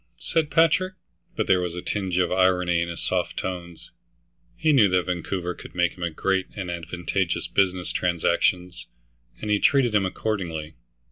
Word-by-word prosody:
said 160 - -1
Patrick. 170 +4 +3 0.4
But - - 0
there 90 -1 +3
was 90 -1 -3
a 90 - -4
tinge 95 -4 -2
of 90 - +2
irony 90 -2 +3
in 85 - -2
his 85 - -5
soft - - -1
tones. 85 -3 -6 0.7
He 155 -1 +3
knew 110 -8 +6
that 90 -1 +2
Vancouver 90 0 -3
could - - -12
make 85 -1 +2
him 85 -2 -3
great 95 +3 0
and 95 -4 -4
advantageous 85 +1 -2
business 95 -2 0
transactions, 90 0 0 0.5
and 105 - -2
he 105 - +3
treated 130 -2 +3
him 100 -2 +3
accordingly. 85 -7 -3
90 Hz, 160 wpm, -25 LUFS, 85-100 Hz, 0.7 s, knew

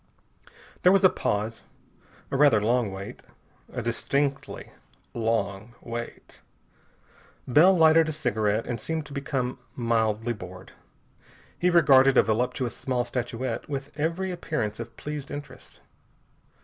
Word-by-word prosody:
There 180 - +6
was 195 +1 +4
a 185 - +7
pause. 105 +2 -2 0.7
A - - -1
rather 135 -6 +5
long 115 0 +1
wait. 95 +1 -8 0.5
A - - -4
distinctly 140 +4 -2 0.4
long 110 -1 -2
wait. 120 0 -8 1.1
Bell 175 +9 +6
lighted 160 0 +5
a - - -1
cigarette 110 -6 0
and 120 -3 -4
seemed 160 -2 -3
to 140 - -10
become 135 -3 -2 0.2
mildly 115 -1 0
bored. 90 -3 -10 0.8
He 180 - +1
regarded 135 -6 +6
a - - +7
voluptuous 120 +2 -1
small 130 -2 -1
statuette 120 +2 -4
with 140 0 -4
every 170 +5 -1
appearance 150 -12 -3
of 115 0 -8
pleased 150 -2 -6
interest. 145 +1 -9
125 Hz, 125 wpm, -26 LUFS, 115-150 Hz, 1.1 s, a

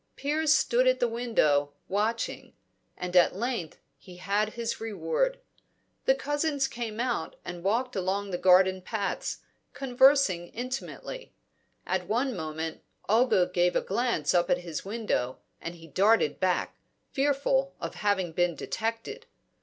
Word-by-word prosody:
Piers 300 +2 +1
stood 260 -3 +3
at 255 0 +3
the 245 - +3
window, 155 -12 +1
watching; 220 +4 -2 0.4
and 180 0 -5
at 180 0 +5
length 225 -6 -3 0.2
he 180 -2 -13
had 205 +4 0
his 235 -1 -3
reward; 480 - -1 0.7
the - - +5
cousins 290 - 0
came 230 -3 -5
out 240 -9 -1
and 175 -1 -7
walked 235 +6 0
along 195 +1 -1
the 175 - -1
garden 185 0 +5
paths, 200 +1 -3 0.3
conversing 265 -8 +3
intimately. 255 - -6 0.5
At 180 -1 -1
one 245 +4 0
moment, 160 -1 -4 0.3
Olga 220 -4 +4
gave 175 0 +2
a - - +3
glance 235 +3 0
up 175 -1 +2
at - - +4
his 170 -3 -6
window, 200 - -2 0.2
and 170 +1 -6
he 165 -1 -13
darted 185 -1 +2
back, 185 -1 0 0.4
fearful 275 -1 +1
of - - -5
having 200 -4 0
been 175 0 +1
detected. 230 - -4
220 Hz, 140 wpm, -28 LUFS, 180-255 Hz, 0.7 s, at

